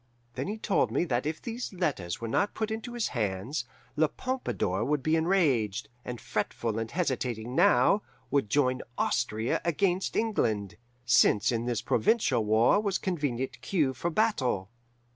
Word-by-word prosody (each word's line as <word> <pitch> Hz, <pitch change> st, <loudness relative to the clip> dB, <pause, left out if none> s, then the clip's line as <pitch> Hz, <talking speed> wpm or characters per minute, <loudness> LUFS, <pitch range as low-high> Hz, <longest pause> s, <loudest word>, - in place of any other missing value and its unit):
Then -, -, -3 dB
he 210 Hz, +2 st, -3 dB
told 210 Hz, -2 st, +1 dB
me -, -, +1 dB
that 130 Hz, -2 st, -1 dB
if 155 Hz, 0 st, -3 dB
those 235 Hz, +1 st, -5 dB
letters 140 Hz, -, -2 dB
were 115 Hz, -, -4 dB
not 200 Hz, -, 0 dB
put 220 Hz, 0 st, -2 dB
into 225 Hz, +2 st, -5 dB
his 240 Hz, -2 st, -1 dB
hands, 105 Hz, +4 st, -2 dB, 0.3 s
La 155 Hz, +1 st, +3 dB
Pompadour 145 Hz, -, -2 dB
would 145 Hz, +2 st, 0 dB
be 155 Hz, +2 st, +2 dB
enraged, 130 Hz, -, +1 dB
and 125 Hz, -1 st, -6 dB
fretful 110 Hz, +1 st, -2 dB
and 115 Hz, 0 st, -3 dB
hesitating 125 Hz, -8 st, -2 dB
now, 200 Hz, +5 st, +4 dB, 0.3 s
would 140 Hz, -6 st, +1 dB
join 130 Hz, 0 st, +2 dB, 0.2 s
Austria 115 Hz, -1 st, 0 dB
against 180 Hz, +2 st, 0 dB
England, 110 Hz, -, 0 dB, 0.3 s
since 105 Hz, -3 st, +4 dB
in 115 Hz, 0 st, -1 dB
this 120 Hz, -3 st, -1 dB
provincial 125 Hz, -, +2 dB
war 110 Hz, -, +4 dB
was 200 Hz, -3 st, 0 dB
convenient 145 Hz, -8 st, -2 dB
cue 150 Hz, -9 st, +1 dB
for 135 Hz, +7 st, -2 dB
battle. 135 Hz, -, 0 dB
135 Hz, 155 wpm, -29 LUFS, 115-185 Hz, 0.3 s, now